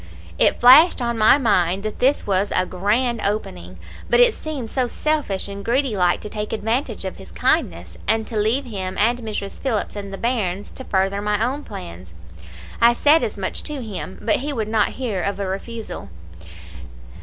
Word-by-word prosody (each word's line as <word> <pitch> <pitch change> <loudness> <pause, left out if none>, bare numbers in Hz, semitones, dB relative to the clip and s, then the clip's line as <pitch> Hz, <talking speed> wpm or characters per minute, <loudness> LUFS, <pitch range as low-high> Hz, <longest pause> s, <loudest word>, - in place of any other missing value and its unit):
"It - - +3
flashed 275 +8 +7
on 235 -1 -1
my 220 +4 +5
mind 195 -7 +1
that 215 -1 -5
this 270 +3 +2
was 200 0 0
a 185 - +2
grand 220 +7 0
opening; 90 - -3 0.3
but 240 - +4
it 245 - +6
seemed 280 -8 -6
so 255 -2 0
selfish 290 -9 -1
and 200 0 -7
greedy 250 +1 0
like 180 -2 +2
to - - -7
take 210 0 -5
advantage 225 +6 -2
of - - -5
his - - -12
kindness, - - -1
and 220 0 +1
to 225 - -7
leave 220 +6 +1
him, 190 -5 -5
and 235 +3 +2
Mrs. 215 -3 -5
Phillips, 225 -7 -2
and 200 -1 -6
the 195 - -6
bairns, 205 -5 -2
to 260 - -10
further 195 +1 0
my 210 +1 0
own 275 +4 -3
plans. 90 - -10 0.7
I 235 +1 +6
said 295 +6 +4
as - - -3
much - - -3
to 295 -4 -4
him, 195 -3 -6
but 220 - +3
he 290 +3 -4
would 225 -6 -2
not 220 -2 +1
hear 225 -8 -2
of 200 +1 -2
a 200 - -2
refusal. 215 +4 -6
215 Hz, 190 wpm, -21 LUFS, 195-245 Hz, 0.7 s, flashed